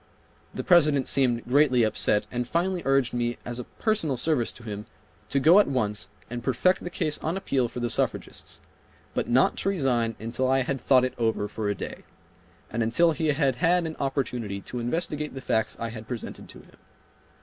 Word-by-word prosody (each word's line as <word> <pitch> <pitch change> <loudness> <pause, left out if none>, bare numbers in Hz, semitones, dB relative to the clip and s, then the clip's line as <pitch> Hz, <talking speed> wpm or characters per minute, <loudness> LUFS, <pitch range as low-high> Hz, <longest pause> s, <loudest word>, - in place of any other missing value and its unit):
The - - -5
President 150 -7 +4
seemed 125 -4 +2
greatly 130 -2 +4
upset 105 -1 +1
and 125 -1 -2
finally 175 +4 0
urged 135 -2 +2
me 120 0 -1
as 120 0 -4
a 125 - -5
personal 205 - -1
service 125 -2 +1
to 120 - -14
him 105 -2 -6 0.4
to 140 - +1
go 165 +8 +7
at 210 - +4
once 105 -6 -1 0.2
and 120 0 -6
perfect 140 +9 +2
the 175 - -4
case 155 -3 -1
on 165 +4 -2
appeal 135 -10 0
for 120 +1 -7
the 120 - +1
suffragists, 115 - -2 0.5
but - - -2
not 125 +2 +3
to - - 0
resign 125 - 0
until 120 +4 -1
I 135 0 +3
had 135 +1 -3
thought 130 -2 +4
it 130 - -3
over 110 -3 0
for 105 0 -3
a 100 - 0
day, - - -7 0.7
and 115 - -1
until 165 +10 +3
he 160 0 -1
had 140 -4 +1
had 175 +2 +2
an 160 -1 -4
opportunity 125 -7 -2
to 125 - -6
investigate 150 +3 -2
the - - -4
facts 110 -3 -1
I 115 - -3
had 110 -1 -9
presented 120 -4 -6
to - - -10
him. - - -21
130 Hz, 195 wpm, -26 LUFS, 115-150 Hz, 0.7 s, go